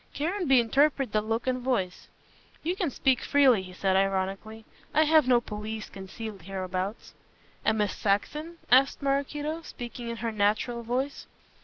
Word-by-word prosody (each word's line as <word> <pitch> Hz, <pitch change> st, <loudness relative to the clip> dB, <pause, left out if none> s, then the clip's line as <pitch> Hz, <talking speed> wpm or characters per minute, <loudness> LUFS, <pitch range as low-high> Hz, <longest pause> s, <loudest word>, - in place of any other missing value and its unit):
Caranby 315 Hz, -4 st, +2 dB
interpreted 270 Hz, +1 st, +2 dB
the 215 Hz, -, +3 dB
look 225 Hz, +2 st, -2 dB
and 255 Hz, -1 st, 0 dB
voice. 195 Hz, -8 st, -1 dB, 0.6 s
"You 345 Hz, +3 st, 0 dB
can 365 Hz, -5 st, -1 dB
speak 265 Hz, -1 st, +1 dB
freely," 265 Hz, -7 st, +4 dB
he 185 Hz, -1 st, -10 dB
said 190 Hz, +1 st, 0 dB
ironically, 195 Hz, +3 st, -1 dB, 0.3 s
"I 310 Hz, -, +6 dB
have 310 Hz, -3 st, +4 dB
no 245 Hz, -2 st, +5 dB
police 215 Hz, -1 st, -6 dB
concealed 200 Hz, +1 st, -8 dB
hereabouts." 185 Hz, +2 st, -4 dB, 0.5 s
"And 220 Hz, -, +2 dB
Miss 210 Hz, -1 st, 0 dB
Saxon?" 300 Hz, +12 st, -1 dB
asked 270 Hz, +3 st, +5 dB
Maraquito, 290 Hz, +3 st, -1 dB
speaking 240 Hz, -5 st, -7 dB
in 235 Hz, -, -3 dB
her 230 Hz, -, 0 dB
natural 215 Hz, +3 st, 0 dB
voice. 255 Hz, +4 st, -3 dB
235 Hz, 150 wpm, -28 LUFS, 205-275 Hz, 0.6 s, I